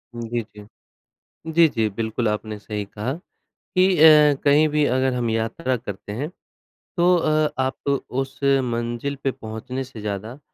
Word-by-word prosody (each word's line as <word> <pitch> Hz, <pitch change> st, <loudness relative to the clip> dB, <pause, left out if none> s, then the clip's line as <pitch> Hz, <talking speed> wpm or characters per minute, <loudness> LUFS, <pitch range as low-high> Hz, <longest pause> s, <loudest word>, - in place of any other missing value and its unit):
जी, 120 Hz, 0 st, -3 dB
जी। 105 Hz, -, -11 dB, 0.9 s
जी, 165 Hz, 0 st, +6 dB
जी, 110 Hz, -5 st, 0 dB
बिल्कुल, 110 Hz, +3 st, -2 dB
आपने 105 Hz, 0 st, -3 dB
सही 105 Hz, -1 st, -5 dB
कहा 105 Hz, +6 st, -4 dB, 0.6 s
कि 185 Hz, -, +6 dB
अ, 150 Hz, -2 st, +7 dB
कहीं 150 Hz, +2 st, +5 dB
भी 150 Hz, 0 st, +2 dB
अगर 130 Hz, 0 st, +1 dB
हम 120 Hz, -2 st, -1 dB
यात्रा 115 Hz, +5 st, -1 dB
करते 105 Hz, -2 st, -8 dB
हैं, 135 Hz, +8 st, -3 dB, 0.7 s
तो 180 Hz, +1 st, +5 dB
अ, 155 Hz, -2 st, +2 dB
आप 130 Hz, +1 st, -2 dB, 0.2 s
उस 135 Hz, +1 st, -4 dB
मंज़िल 125 Hz, 0 st, 0 dB
पे 135 Hz, -, +1 dB
पहुँचने 115 Hz, +4 st, -6 dB
से 120 Hz, -4 st, -11 dB
ज़्यादा 105 Hz, +5 st, -5 dB
125 Hz, 150 wpm, -23 LUFS, 110-145 Hz, 0.9 s, अ